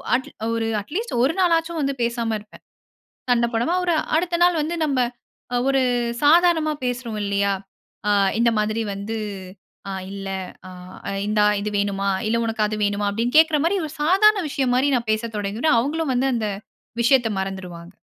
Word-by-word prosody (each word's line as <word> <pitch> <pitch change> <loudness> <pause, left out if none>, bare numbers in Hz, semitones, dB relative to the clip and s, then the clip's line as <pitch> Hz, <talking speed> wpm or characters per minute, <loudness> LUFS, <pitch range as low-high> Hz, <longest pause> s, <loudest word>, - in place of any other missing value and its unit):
At 260 - -3 0.2
1 225 -1 -1
at least 390 - -5
1 275 +5 +2
நாளாச்சும் 335 -2 +2
வந்து 275 -1 0
பேசாம 235 -1 -1
இருப்பேன், 210 +1 -17 0.7
சண்ட 235 -1 +3
போடமா. 240 +10 +1
1 350 -2 +2 0.2
அடுத்த 340 +1 0
நாள் 350 -2 +3
வந்து 330 +3 -2
நம்ப 275 -4 0 0.5
அ - - +2
1 270 0 +3 0.4
சாதாரணமா 325 0 +4
பேசுறோம் 245 -3 -3
இல்லயா. 200 0 +1 0.6
ஆ - - +3 0.3
இந்த 235 0 +4
மாதிரி 215 +2 -1
வந்து 205 +3 -4 0.7
ஆ - - -3 0.2
இல்ல 195 -1 -6 0.8
ஆ - - -1 0.2
இந்தா 210 0 +2 0.2
இது 210 +1 -3
வேணுமா? 200 -1 0 0.2
இல்ல 230 +1 +1
உனக்கு 225 -1 0
அது 215 - -3
வேணுமா 205 0 0
அப்பிடின்னு 230 +6 -1
கேட்குற 315 -1 +5
மாரி 355 +4 +2
1 300 - -9
சாதாரண 395 +5 +4
விஷயம் 260 -3 0
மாரி 270 +3 +2
நான் 235 -2 -2
பேசத் 220 0 -3
தொடங்கிடுவேன். 215 +7 +1
அவுங்களும் 295 +3 -1
வந்து 255 +2 +1
அந்த 220 -3 -1 0.5
விஷயத்த 240 -1 +3
மறந்துருவாங்க. 185 -2 -7
240 Hz, 160 wpm, -22 LUFS, 210-310 Hz, 0.8 s, கேட்குற